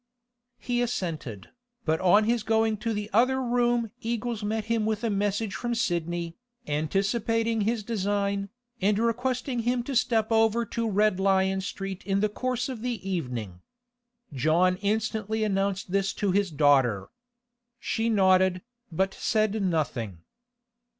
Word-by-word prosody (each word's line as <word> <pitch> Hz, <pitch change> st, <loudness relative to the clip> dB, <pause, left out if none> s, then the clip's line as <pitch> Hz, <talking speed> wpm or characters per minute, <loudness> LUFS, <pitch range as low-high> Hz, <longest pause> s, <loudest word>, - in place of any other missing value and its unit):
He 245 Hz, -1 st, -1 dB
assented. 165 Hz, -, -3 dB, 0.4 s
But 160 Hz, 0 st, +1 dB
on 190 Hz, +4 st, +5 dB
his 235 Hz, +1 st, +1 dB
going 220 Hz, 0 st, +2 dB
into 220 Hz, +2 st, -3 dB
the 210 Hz, -1 st, -3 dB
other 255 Hz, +4 st, +3 dB
room 240 Hz, -2 st, +1 dB
Eagles 235 Hz, -1 st, -2 dB
met 215 Hz, +1 st, -1 dB
him 230 Hz, -1 st, 0 dB
with 220 Hz, +1 st, -1 dB
a 230 Hz, -, +1 dB
message 205 Hz, +1 st, -1 dB
from 240 Hz, -1 st, -2 dB
Sidney, 170 Hz, -6 st, -2 dB, 0.3 s
anticipating 210 Hz, +9 st, 0 dB
his 220 Hz, +1 st, 0 dB
design, 200 Hz, -2 st, -1 dB, 0.3 s
and 200 Hz, +2 st, +3 dB
requesting 245 Hz, +2 st, -1 dB
him 240 Hz, +1 st, 0 dB
to 270 Hz, +2 st, -4 dB
step 225 Hz, -2 st, +2 dB
over 225 Hz, +1 st, +3 dB
to 230 Hz, -1 st, -2 dB
Red 210 Hz, -1 st, +2 dB
Lion 190 Hz, 0 st, +2 dB
Street 195 Hz, -1 st, -5 dB
in 195 Hz, +1 st, 0 dB
the 215 Hz, +1 st, +2 dB
course 250 Hz, +2 st, -2 dB
of 255 Hz, -5 st, -6 dB
the 240 Hz, -5 st, -4 dB
evening. 125 Hz, -, -4 dB, 0.7 s
John 165 Hz, +7 st, +2 dB
instantly 220 Hz, +1 st, -1 dB
announced 195 Hz, -2 st, -1 dB
this 195 Hz, +1 st, +1 dB
to 205 Hz, -3 st, 0 dB
his 200 Hz, 0 st, +1 dB
daughter. 135 Hz, -, +3 dB, 0.7 s
She 225 Hz, +1 st, -1 dB
nodded, 190 Hz, -3 st, +3 dB, 0.3 s
but 190 Hz, +4 st, 0 dB
said 215 Hz, -1 st, 0 dB
nothing. 130 Hz, -, -2 dB
205 Hz, 140 wpm, -27 LUFS, 185-230 Hz, 0.7 s, on